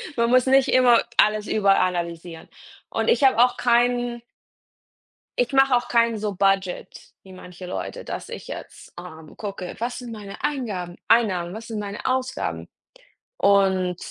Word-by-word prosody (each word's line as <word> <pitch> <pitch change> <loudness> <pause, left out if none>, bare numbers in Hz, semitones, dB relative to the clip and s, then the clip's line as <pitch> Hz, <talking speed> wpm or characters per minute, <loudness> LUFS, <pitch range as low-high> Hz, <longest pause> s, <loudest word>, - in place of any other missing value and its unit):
Man 235 0 +1
muss 255 0 +4
nicht 270 0 +4
immer 250 -2 +5
alles 215 0 +3
überanalysieren. 175 -4 0 0.4
Und - - -1
ich 380 -12 +2
habe 265 -3 +5
auch 245 0 +4
keinen 240 0 +1 1.2
ich 245 +2 0
mache 270 -1 +4
auch 240 - 0
keinen 230 -1 +2
so 210 -1 -3
Budget 195 -1 -1
wie 190 -1 -14
manche 180 0 -11
Leute, - - -6
dass - - -7
ich - - -8
jetzt, - - -10
ähm, 160 -3 -12
gucke: 195 -4 -6
„Was 245 +1 -3
sind 245 -2 -8
meine 205 -3 -9
Eingaben 210 -12 -3
Einnahmen, 185 -6 +2
was 225 +1 -8
sind 220 -2 -5
meine 205 0 -6
Ausgaben“. 255 0 -2 0.7
Und 190 -3 +2
215 Hz, 150 wpm, -23 LUFS, 185-245 Hz, 1.2 s, immer